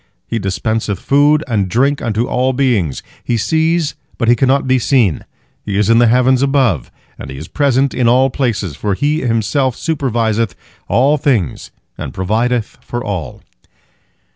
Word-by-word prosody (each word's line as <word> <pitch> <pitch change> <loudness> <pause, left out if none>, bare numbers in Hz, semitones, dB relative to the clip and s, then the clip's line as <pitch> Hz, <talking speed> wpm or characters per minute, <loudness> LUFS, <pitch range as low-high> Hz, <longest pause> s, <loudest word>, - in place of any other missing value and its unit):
He 115 - -3
dispenseth 100 +1 -2
food 145 +2 +3
and 105 -6 0
drink 135 +8 +1
unto 115 0 -1
all 130 +1 0
beings. 120 - 0 0.2
He 120 - -1
sees, 160 +5 +1 0.2
but 115 - -1
He 120 - +5
cannot 135 +2 +2
be 130 0 +2
seen, 115 - +1 0.4
He 100 -1 -3
is 105 +2 +2
in 115 - +5
the 120 - +5
heavens 125 +2 +3
above, 130 - +1 0.3
and - - -8
He 65 - -8
is 75 +3 -8
present 140 -2 +1
in 125 -2 +1
all 130 +2 +3
places, 110 - -2
for 100 +5 -2
He 150 +7 0
Himself 120 +2 0
superviseth 115 - -1 0.3
all 140 +5 +3
things 130 - -1 0.3
and - - -6
provideth 115 +6 -1
for 120 -1 -5
all." 90 - -5
120 Hz, 160 wpm, -16 LUFS, 105-135 Hz, 0.4 s, He